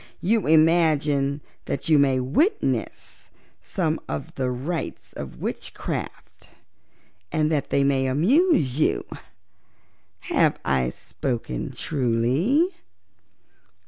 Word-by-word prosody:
You 220 +1 +1
imagine 155 -3 +3 0.2
that 135 - -3
you 155 -2 +5
may 135 -2 +3
witness 305 - -1 0.3
some 165 -4 -1
of 140 - -5
the 130 -1 -1
rites 140 +7 -4
of - - -8
witchcraft, - - -6 0.8
and 155 0 +1
that 150 -3 0
they 140 - +2
may 135 -1 +2
amuse 160 - +3
you. - - +1 1.2
Have - - +1
I 65 -2 +1
spoken 120 - -4
truly?" 135 - +1
145 Hz, 95 wpm, -24 LUFS, 130-165 Hz, 1.2 s, you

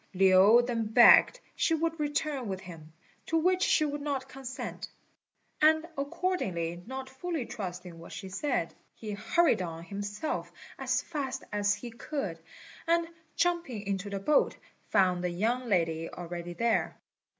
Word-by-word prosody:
Lin 195 +5 +6
then 230 -3 -1
begged 240 - +7 0.2
she 325 - +2
would 330 0 -1
return 295 -3 -1
with 190 -1 -4
him, 165 -4 -11 0.4
to 325 - +1
which 365 +3 +2
she 310 -5 +3
would 290 0 -3
not 275 -2 -2
consent; 265 -1 -7 0.7
and 315 +1 +5
accordingly, 195 - -2
not 265 +1 -5
fully 275 +1 -4
trusting 180 -7 -7
what 170 - -11
she 190 - -7
said, 200 - -2 0.2
he 215 -2 -7
hurried 220 - +2
on 165 -2 -5
himself 205 - -4 0.3
as - - 0
fast 270 -5 -4
as 205 0 +2
he 240 - -8
could, 225 - -4 0.5
and, 335 0 +2 0.3
jumping 335 -11 0
into 195 0 -2
the 200 -1 -3
boat, 290 +9 +2 0.3
found 185 -3 +3
the 180 - 0
young 230 +8 -1
lady 165 -4 +1
already 175 0 -6
there. 230 +5 0
230 Hz, 145 wpm, -30 LUFS, 185-295 Hz, 0.7 s, begged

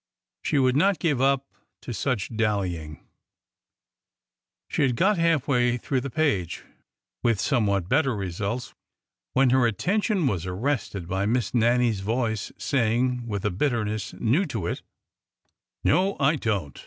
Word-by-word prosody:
She - - 0
would 130 -1 +3
not 190 +5 +3
give 145 -7 0
up 135 0 +2 0.4
to 120 - -5
such 115 -1 -2
dallying! 90 -8 -2 1.6
She - - -2
had 130 -4 +2
got 190 - +2
half 165 -4 +2
way 125 -3 +2
through 130 +2 -1
the 140 - -4
page, 120 - 0 0.6
with 115 -4 +2
somewhat 100 - +1
better 135 +1 +2
results, 100 +5 -3 0.6
when 130 -1 +4
her 130 -2 +4
attention 195 - 0
was 95 -8 -1
arrested 100 -3 -2
by 95 +2 -1
Miss 120 -2 0
Nannie's 120 -2 +2
voice 110 +1 -1
saying, 125 0 0
with 100 -3 -3
a 105 - +1
bitterness 110 -1 -1
new 145 - +1
to 110 - -4
it: - - -3 0.5
'' - - -53
No, 195 +2 +2
I 140 +2 +3
don't 100 - -2
120 Hz, 140 wpm, -25 LUFS, 100-140 Hz, 1.6 s, when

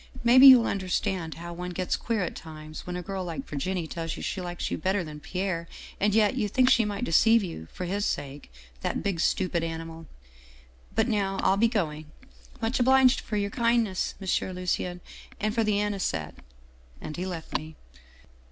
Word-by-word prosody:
Maybe 255 +3 +8
you'll 255 -3 +9
under 190 -2 -2
stand 175 -3 -1
how 170 +1 -7
one 180 +1 -5
gets 185 -1 0
queer 225 -4 -1
at - - -4
times, 155 0 -9
when 180 - -4
a 180 - -4
girl 190 +1 -4
like 165 -6 -5
Vir 145 - -5
ginie 180 +2 -2
tells 165 0 -4
you - - -7
she 190 - -3
likes 175 -1 -4
you - - -2
better 190 +3 0
than 150 -2 -8
Pierre, 180 0 -3 0.3
and 205 +1 +2
yet 215 0 +4
you 225 -5 0
think 255 +5 +3
she 230 - +4
might 205 +1 -3
deceive 225 +3 +4
you 120 - -6
for 180 - -5
his 200 +3 -1
sake 140 - -4 0.3
that - - -2
big, 195 -4 -1
stupid 175 -1 +1
animal 165 0 -6 0.9
But 225 - +2
now 200 -4 0
I'll 190 - +4
be 225 +4 +4
going. 155 -9 -2 0.5
Much 230 +2 -1
obliged 260 0 +5
for 210 - -3
your 200 0 -1
kindness, 230 -5 +1
M. 190 -1 -1
Lucien, 180 0 -2 0.4
and 215 0 0
for 230 0 +1
the 210 -1 +1
anisette 195 - -2 0.4
' - - -28
And 155 - -7
he 180 +2 -3
left 170 -3 -6
me. 155 +1 -3
185 Hz, 195 wpm, -27 LUFS, 165-210 Hz, 0.9 s, you'll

